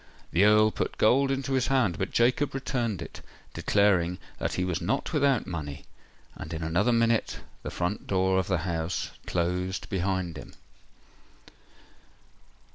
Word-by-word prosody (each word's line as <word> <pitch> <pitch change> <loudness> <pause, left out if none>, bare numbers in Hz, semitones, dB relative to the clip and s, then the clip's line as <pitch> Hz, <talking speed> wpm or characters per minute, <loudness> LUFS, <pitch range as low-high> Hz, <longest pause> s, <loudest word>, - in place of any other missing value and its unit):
The 90 +4 +4
Earl 105 +1 +5
put - - -3
gold 135 +5 +4
into 135 0 -1
his 130 -2 +2
hand; 125 -11 +1
but - - -1
Jacob 130 +4 +2
returned 120 -8 -2
it, - - -11 0.3
declaring 90 -4 +2 0.2
that - - -2
he 90 - -1
was 90 -1 -2
not 135 - -1
without 140 -5 +2
money; 75 -5 -6 0.5
and 80 - -8
in 80 - -4
another 85 +9 +2
minute 115 -1 +1 0.2
the - - -5
front 90 +4 -3
door 95 0 +2
of 95 - -2
the 90 - +1
house 85 -1 -2 0.2
closed 90 +2 -1
behind 95 -3 -1
him. - - -12
95 Hz, 145 wpm, -27 LUFS, 90-120 Hz, 0.5 s, Earl